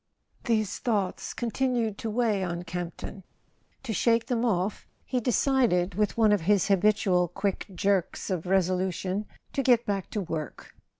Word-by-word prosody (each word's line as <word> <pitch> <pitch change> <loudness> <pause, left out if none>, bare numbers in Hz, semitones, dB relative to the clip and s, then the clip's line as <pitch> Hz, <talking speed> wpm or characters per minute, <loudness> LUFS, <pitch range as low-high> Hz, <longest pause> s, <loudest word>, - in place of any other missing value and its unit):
XXX 235 - +3
HESE 215 -2 -2
thoughts 205 -6 -1
continued 240 -2 0
to 225 - -3
weigh 215 -3 +1
on 175 -1 -3
Camp¬ 175 0 -3
le 170 - -10 0.2
ton; 195 -1 -13 0.6
to 235 -4 -3
shake 230 +2 +2
them 240 -2 -1
off 200 -3 -1 0.2
he 255 - 0
decided, 240 -7 +2
with 210 +4 0
one 220 -2 +5
of 205 -3 +3
his 200 +3 +2
habitual 195 -2 +3
quick 195 +3 -2
jerks 195 +1 0
of 180 -1 -2
resolution, 185 +1 0 0.3
to 275 - +1
get 245 -2 +4
back 195 -2 -2
to 210 - -3
work. 160 -6 -5
200 Hz, 165 wpm, -27 LUFS, 180-230 Hz, 0.6 s, one